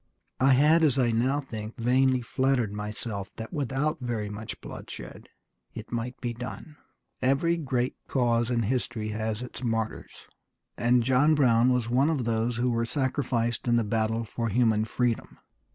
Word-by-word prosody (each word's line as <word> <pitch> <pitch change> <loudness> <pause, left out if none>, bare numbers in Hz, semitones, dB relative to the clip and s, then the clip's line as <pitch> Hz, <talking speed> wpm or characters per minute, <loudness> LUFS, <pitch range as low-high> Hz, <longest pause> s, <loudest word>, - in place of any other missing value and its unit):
I 135 +1 +5
had, 150 +5 +5
as 145 -4 +3
I 120 -3 +3
now 130 +5 +1
think 110 -4 -7
vainly, 130 +1 +2
flattered 130 -4 0
myself 105 -1 -5
that 110 +7 -7
without 145 +2 -1
very 115 -5 -3
much 105 +1 -7
bloodshed - - -9 0.5
it - - -8
might 120 +2 -3
be 120 -2 -3
done." 125 +6 -8 0.5
Every 140 +6 +2
great 130 -6 -1
cause 120 -2 +1
in 120 -2 +1
history 115 -1 -2
has 110 +2 -3
its 125 0 -8
martyrs, 115 -2 -3 0.5
and 120 0 +3
John 130 +5 +4
Brown 125 -3 +4
was 125 -2 +1
one 130 +5 +3
of 140 -7 0
those 115 +1 0
who 125 +1 +1
were 115 0 +1
sacrificed 125 -2 -1
in 120 - +4
the 115 - +3
battle 110 +1 0
for 115 +1 -3
human 110 -1 +2
freedom. 120 0 -1
120 Hz, 160 wpm, -27 LUFS, 115-130 Hz, 0.5 s, I